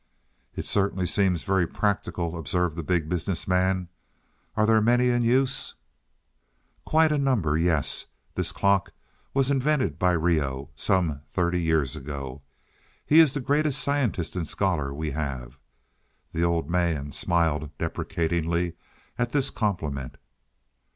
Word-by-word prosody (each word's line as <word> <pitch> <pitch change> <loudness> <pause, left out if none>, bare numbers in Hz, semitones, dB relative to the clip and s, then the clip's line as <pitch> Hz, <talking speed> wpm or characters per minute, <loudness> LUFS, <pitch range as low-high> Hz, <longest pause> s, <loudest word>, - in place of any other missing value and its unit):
"It - - -4
certainly 95 -2 0
seems 90 -2 +1
very 95 -3 +2
practical," 85 -5 -1
observed 85 +1 -1
the 85 - -3
Big 85 -1 0
Business 90 +1 -2
Man. 90 0 +1 0.7
"Are 110 - +4
there 110 0 +4
many 120 +3 +3
in 120 0 +2
use?" 130 +3 +2 1.1
"Quite 160 0 +4
a 150 - +1
number, 115 - +1
yes. 80 -2 +1 0.3
This - - -2
clock 100 -1 +1 0.4
was 135 0 +2
invented 140 0 +1
by 90 0 +3
Reoh, 75 -5 0
some 80 -3 0
thirty 90 -1 0
years 80 -6 +1
ago. 70 -1 -6 0.6
He 155 - +6
is 155 -4 +6
the 145 - -1
greatest 145 +1 +1
scientist 130 - -1
and 85 -4 -2
scholar 80 -9 0
we 75 +2 -3
have." 70 -3 -5 0.7
The 80 - -1
old 85 -3 +1
man 85 -5 0
smiled 80 -2 0
deprecatingly 85 +1 -1 0.5
at 120 -1 -1
this 140 -2 +2
compliment. 80 - -2
90 Hz, 130 wpm, -26 LUFS, 80-115 Hz, 1.1 s, He